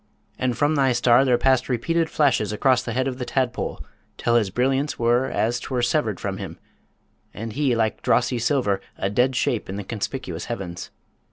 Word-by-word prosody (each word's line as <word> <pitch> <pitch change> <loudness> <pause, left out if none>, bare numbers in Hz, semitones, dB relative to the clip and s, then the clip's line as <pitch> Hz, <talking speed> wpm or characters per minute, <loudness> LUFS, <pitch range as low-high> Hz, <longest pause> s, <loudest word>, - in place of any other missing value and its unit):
And 125 -2 0
from 145 +2 +2
thy 135 -4 +3
star 120 +1 +4
there 125 -3 +3
passed 130 0 +2
repeated 160 +7 0
flashes 130 -8 +2
across 125 +4 +2
the 115 - -5
head 130 +2 0
of 130 -1 -4
the - - -2
tadpole, 125 -1 -2 0.3
till 115 - 0
his 115 -4 +3
brilliance 135 +7 0
was 120 +2 +2
as 120 +2 0
'twere 125 -1 -2
severed 120 - 0
from - - -3
him, - - -7 0.8
and 110 0 -5
he, 140 -2 +1
like 110 -1 0
drossy 125 - +2
silver, 115 -7 +1 0.2
a 95 - -1
dead 125 +4 +2
shape 120 -4 -1
in 95 - -4
the 100 - -4
conspicuous 100 -4 -4
heavens. 95 -7 -6
125 Hz, 185 wpm, -23 LUFS, 115-130 Hz, 0.8 s, star